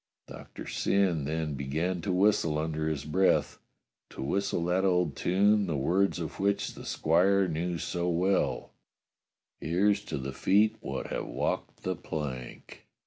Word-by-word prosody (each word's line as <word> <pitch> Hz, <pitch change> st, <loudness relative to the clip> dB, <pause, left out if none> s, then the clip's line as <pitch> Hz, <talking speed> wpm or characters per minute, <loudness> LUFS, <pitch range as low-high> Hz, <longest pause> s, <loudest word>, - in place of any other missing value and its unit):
Doctor -, -, -10 dB
Syn 90 Hz, -7 st, +1 dB
then 80 Hz, 0 st, -2 dB
began 80 Hz, +7 st, -2 dB
to 95 Hz, -, -2 dB
whistle 90 Hz, -5 st, +2 dB
under 80 Hz, 0 st, -1 dB
his 75 Hz, -3 st, -3 dB
breath; 95 Hz, +5 st, +2 dB, 0.5 s
to -, -, -7 dB
whistle 85 Hz, +3 st, -1 dB
that 90 Hz, +2 st, +1 dB
old 90 Hz, -5 st, +2 dB
tune 100 Hz, +2 st, +3 dB
the 80 Hz, -4 st, -1 dB
words 90 Hz, +8 st, +1 dB
of 80 Hz, -3 st, -6 dB
which 100 Hz, +1 st, 0 dB
the -, -, -10 dB
squire 95 Hz, +4 st, +3 dB
knew 85 Hz, +1 st, -2 dB
so 90 Hz, +1 st, -2 dB
well: 90 Hz, +3 st, 0 dB, 0.9 s
"Here's 100 Hz, +5 st, +1 dB
to -, -, -4 dB
the 65 Hz, 0 st, -5 dB
feet 105 Hz, +9 st, +3 dB
wot -, -, -5 dB
have -, -, -3 dB
walked -, -, -3 dB
the 95 Hz, 0 st, -1 dB
plank." 75 Hz, -7 st, -7 dB
90 Hz, 145 wpm, -29 LUFS, 80-95 Hz, 0.9 s, tune